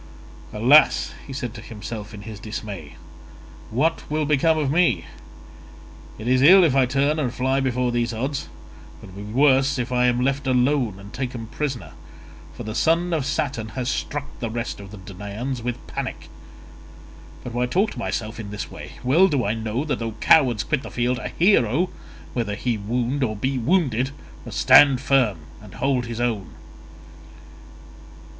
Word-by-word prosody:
"Alas," 125 Hz, +8 st, +4 dB, 0.2 s
said 130 Hz, -2 st, -4 dB
he -, -, -15 dB
to 110 Hz, -, -8 dB
himself 105 Hz, -1 st, -7 dB
in 105 Hz, -1 st, -10 dB
his 110 Hz, -2 st, -8 dB
dismay, 105 Hz, -7 st, -7 dB, 0.7 s
"what 155 Hz, +9 st, +1 dB
will 155 Hz, 0 st, 0 dB
become 155 Hz, +2 st, +3 dB
of 145 Hz, -3 st, 0 dB
me? 175 Hz, +2 st, +2 dB, 1.1 s
It 110 Hz, -, -7 dB
is 130 Hz, +1 st, +3 dB
ill 185 Hz, +7 st, +8 dB
if 150 Hz, -6 st, +3 dB
I 130 Hz, -2 st, +4 dB
turn 140 Hz, +4 st, +1 dB
and 130 Hz, -5 st, 0 dB
fly 130 Hz, +2 st, 0 dB
before 125 Hz, -2 st, 0 dB
these 120 Hz, 0 st, 0 dB
odds, 135 Hz, +5 st, -3 dB, 0.5 s
but -, -, -12 dB
it -, -, -14 dB
will 100 Hz, -, -8 dB
be 105 Hz, -, -8 dB
worse 135 Hz, +2 st, +3 dB
if 125 Hz, 0 st, -3 dB
I 125 Hz, 0 st, +3 dB
am 120 Hz, 0 st, +1 dB
left 135 Hz, +1 st, 0 dB
alone 125 Hz, -3 st, +2 dB
and 100 Hz, +2 st, -12 dB
taken 125 Hz, -3 st, -4 dB
prisoner, 130 Hz, +2 st, -4 dB, 0.6 s
for -, -, -7 dB
the 110 Hz, -, -5 dB
son 165 Hz, +10 st, +2 dB
of 145 Hz, -4 st, 0 dB
Saturn 120 Hz, -6 st, -2 dB
has 125 Hz, -1 st, -1 dB
struck 145 Hz, 0 st, -3 dB
the 115 Hz, -, -3 dB
rest 115 Hz, 0 st, -4 dB
of 100 Hz, -1 st, -10 dB
the 105 Hz, -, -10 dB
Danaans 105 Hz, +7 st, -6 dB
with 120 Hz, +1 st, -4 dB
panic. -, -, -6 dB, 1.1 s
But 120 Hz, -, -7 dB
why 125 Hz, +1 st, 0 dB
talk 195 Hz, -, +1 dB
to -, -, -8 dB
myself 110 Hz, +2 st, -3 dB
in 105 Hz, -2 st, -6 dB
this 105 Hz, 0 st, -6 dB
way? -, -, -9 dB
Well 155 Hz, +10 st, +5 dB
do 140 Hz, -9 st, 0 dB
I 105 Hz, -, +1 dB
know 115 Hz, +5 st, -3 dB
that 150 Hz, -, -2 dB
though 115 Hz, -1 st, -3 dB
cowards 120 Hz, -1 st, +4 dB
quit 150 Hz, -4 st, -1 dB
the -, -, -8 dB
field, 120 Hz, +1 st, -1 dB
a -, -, -4 dB
hero, 175 Hz, -, +2 dB, 0.4 s
whether 110 Hz, -4 st, -2 dB
he 120 Hz, +2 st, -1 dB
wound 120 Hz, +6 st, -1 dB
or 110 Hz, -3 st, -1 dB
be 130 Hz, +5 st, -1 dB
wounded, 130 Hz, -, +1 dB, 0.4 s
must -, -, -6 dB
stand 140 Hz, -3 st, +7 dB
firm 130 Hz, -, +2 dB, 0.2 s
and 105 Hz, -3 st, -13 dB
hold 130 Hz, -2 st, 0 dB
his 115 Hz, 0 st, -5 dB
own." 110 Hz, -7 st, -2 dB
125 Hz, 175 wpm, -23 LUFS, 110-140 Hz, 1.1 s, ill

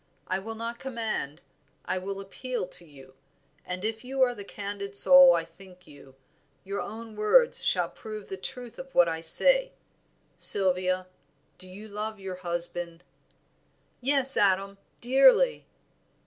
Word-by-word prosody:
I 185 Hz, +1 st, -3 dB
will 225 Hz, +3 st, -8 dB
not 230 Hz, +1 st, -7 dB
command, 220 Hz, -, -5 dB, 0.4 s
I 185 Hz, -, -3 dB
will 195 Hz, +1 st, -7 dB
appeal 220 Hz, +4 st, -6 dB
to 175 Hz, -, -6 dB
you, 135 Hz, -3 st, -17 dB, 0.5 s
and 180 Hz, +2 st, -6 dB
if 220 Hz, +1 st, -4 dB
you 265 Hz, +1 st, -1 dB
are 245 Hz, -1 st, +1 dB
the 205 Hz, -, -10 dB
candid 200 Hz, 0 st, -8 dB
soul 270 Hz, +3 st, +7 dB
I 165 Hz, -, -3 dB
think 180 Hz, +2 st, -18 dB
you, 140 Hz, -2 st, -17 dB, 0.5 s
your 200 Hz, +1 st, -5 dB
own 225 Hz, +1 st, -9 dB
words 340 Hz, -, +2 dB
shall -, -, 0 dB
prove 215 Hz, -2 st, -10 dB
the 190 Hz, -, -6 dB
truth 240 Hz, +5 st, -9 dB
of 265 Hz, 0 st, -11 dB
what 175 Hz, -, +5 dB
I 160 Hz, 0 st, -4 dB
say. -, -, +4 dB, 0.7 s
Sylvia, 185 Hz, -1 st, +3 dB, 0.5 s
do 185 Hz, 0 st, -11 dB
you 205 Hz, +4 st, -12 dB
love 215 Hz, +1 st, -6 dB
your 190 Hz, -1 st, -8 dB
husband?" 175 Hz, -1 st, +2 dB, 1.0 s
"Yes, 270 Hz, +1 st, +5 dB
Adam, 195 Hz, 0 st, 0 dB, 0.2 s
dearly." 270 Hz, -, +3 dB
200 Hz, 145 wpm, -26 LUFS, 185-240 Hz, 1.0 s, soul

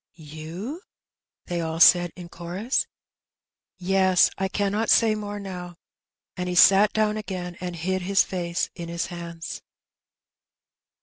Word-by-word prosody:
^^You!" 160 Hz, -, -7 dB, 0.7 s
they 175 Hz, -1 st, -3 dB
all 160 Hz, 0 st, -3 dB
said 175 Hz, 0 st, +6 dB
in 175 Hz, -1 st, -9 dB
chorus. 175 Hz, +8 st, -2 dB, 0.9 s
*'Yes. 185 Hz, 0 st, +3 dB
I 190 Hz, -, -1 dB
cannot 205 Hz, +3 st, -1 dB
say 225 Hz, -2 st, +5 dB
more 205 Hz, -1 st, -5 dB
now." 180 Hz, -3 st, -7 dB, 0.6 s
And 180 Hz, -1 st, -3 dB
he 180 Hz, -, -2 dB
sat 195 Hz, +4 st, +6 dB
down 215 Hz, 0 st, +1 dB
again, 185 Hz, -4 st, -5 dB
and 180 Hz, -1 st, -4 dB
hid 185 Hz, +3 st, -2 dB
his 195 Hz, +2 st, +3 dB
face 175 Hz, -2 st, -3 dB
in 170 Hz, -1 st, -8 dB
his 170 Hz, 0 st, -2 dB
hands. 170 Hz, -1 st, -7 dB
180 Hz, 130 wpm, -24 LUFS, 170-200 Hz, 0.9 s, said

